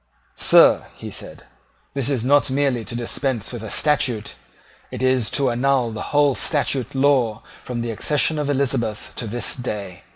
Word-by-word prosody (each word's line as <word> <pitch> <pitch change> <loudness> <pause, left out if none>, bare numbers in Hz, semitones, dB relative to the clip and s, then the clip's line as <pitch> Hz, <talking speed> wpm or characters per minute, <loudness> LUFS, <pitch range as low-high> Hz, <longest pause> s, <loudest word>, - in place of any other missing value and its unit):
"Sir," - - +5 0.2
said - - -9
he, - - -25 0.5
"this 135 -1 -1
is 130 -5 -1
not 145 +1 +4
merely 135 -3 0
to 120 - -5
dispense 120 -1 -2
with 120 - -6
a 110 - -6
statute; 125 -8 +1 0.6
it 130 - -5
is 130 -3 +2
to 135 -3 +1
annul 125 -1 +1
the 110 - -6
whole 145 -1 +3
statute 135 -2 0
law 130 -6 +2 0.2
from 120 -2 -4
the 115 0 -3
accession 150 +6 +1
of 145 -1 -2
Elizabeth 130 -6 -1
to 115 - -4
this 120 +3 -3
day. 100 -7 -6
130 Hz, 165 wpm, -21 LUFS, 115-140 Hz, 0.6 s, Sir